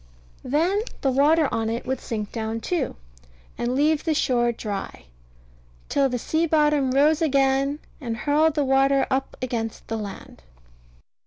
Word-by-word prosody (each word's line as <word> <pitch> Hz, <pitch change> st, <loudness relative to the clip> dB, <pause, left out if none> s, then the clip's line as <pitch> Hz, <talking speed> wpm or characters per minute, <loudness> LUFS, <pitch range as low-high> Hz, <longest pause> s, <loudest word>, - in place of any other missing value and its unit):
Then 335 Hz, +10 st, +1 dB, 0.2 s
the 270 Hz, -, +2 dB
water 295 Hz, +4 st, +4 dB
on 225 Hz, 0 st, -1 dB
it 230 Hz, +1 st, -3 dB
would 260 Hz, 0 st, -2 dB
sink 210 Hz, -3 st, -4 dB
down 225 Hz, 0 st, -3 dB
too, 340 Hz, +6 st, -2 dB, 0.6 s
and 240 Hz, +1 st, -2 dB
leave 300 Hz, +2 st, +2 dB
the 320 Hz, -2 st, 0 dB
shore 240 Hz, -4 st, +2 dB
dry; 200 Hz, -, -6 dB, 0.8 s
till 275 Hz, -1 st, +2 dB
the 250 Hz, -, -1 dB
sea 320 Hz, +7 st, 0 dB
bottom 300 Hz, -3 st, +2 dB
rose 295 Hz, +5 st, +3 dB
again, 275 Hz, -1 st, +2 dB, 0.2 s
and 235 Hz, -6 st, -4 dB
hurled 295 Hz, +6 st, +2 dB
the 295 Hz, -2 st, +1 dB
water 270 Hz, +1 st, +3 dB
up 265 Hz, +1 st, -1 dB
again 235 Hz, -3 st, -1 dB
against 225 Hz, -, -10 dB
the 225 Hz, -, -2 dB
land. 200 Hz, -, -8 dB
270 Hz, 155 wpm, -24 LUFS, 235-300 Hz, 0.8 s, water